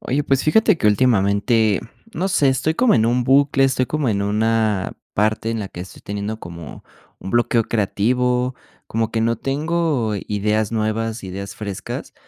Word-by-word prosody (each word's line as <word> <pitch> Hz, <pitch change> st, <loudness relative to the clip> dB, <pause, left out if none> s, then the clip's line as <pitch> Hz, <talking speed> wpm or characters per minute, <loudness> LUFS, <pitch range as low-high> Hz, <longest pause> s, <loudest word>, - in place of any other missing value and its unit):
Oye, 145 Hz, +2 st, -1 dB
pues 135 Hz, -1 st, +1 dB
fíjate 210 Hz, +5 st, +4 dB
que 105 Hz, -, +1 dB
últimamente, 105 Hz, -1 st, +2 dB, 0.3 s
no 190 Hz, -1 st, -1 dB
sé, 150 Hz, -7 st, +3 dB
estoy 135 Hz, +4 st, +1 dB
como 245 Hz, +6 st, +3 dB
en 110 Hz, -1 st, +3 dB
un 125 Hz, +2 st, +2 dB
bucle, 135 Hz, +1 st, +4 dB
estoy 130 Hz, -1 st, +1 dB
como 150 Hz, -2 st, -1 dB
en 100 Hz, -2 st, 0 dB
una 105 Hz, -1 st, 0 dB, 0.2 s
parte 110 Hz, +2 st, 0 dB
en 115 Hz, -1 st, -2 dB
la 100 Hz, -, -5 dB
que 90 Hz, -, -9 dB
estoy 95 Hz, -, -10 dB
teniendo 105 Hz, +2 st, -4 dB
como 85 Hz, -2 st, -10 dB, 0.4 s
un 95 Hz, -, -6 dB
bloqueo 120 Hz, -1 st, +2 dB
creativo, 125 Hz, +4 st, 0 dB, 0.3 s
como 115 Hz, 0 st, -1 dB
que 115 Hz, -, 0 dB
no 115 Hz, +1 st, +1 dB
tengo 145 Hz, -5 st, -1 dB
ideas 105 Hz, +1 st, 0 dB
nuevas, 110 Hz, +1 st, -2 dB
ideas 100 Hz, +1 st, -6 dB
frescas 100 Hz, -3 st, -6 dB
115 Hz, 165 wpm, -20 LUFS, 105-130 Hz, 0.4 s, fíjate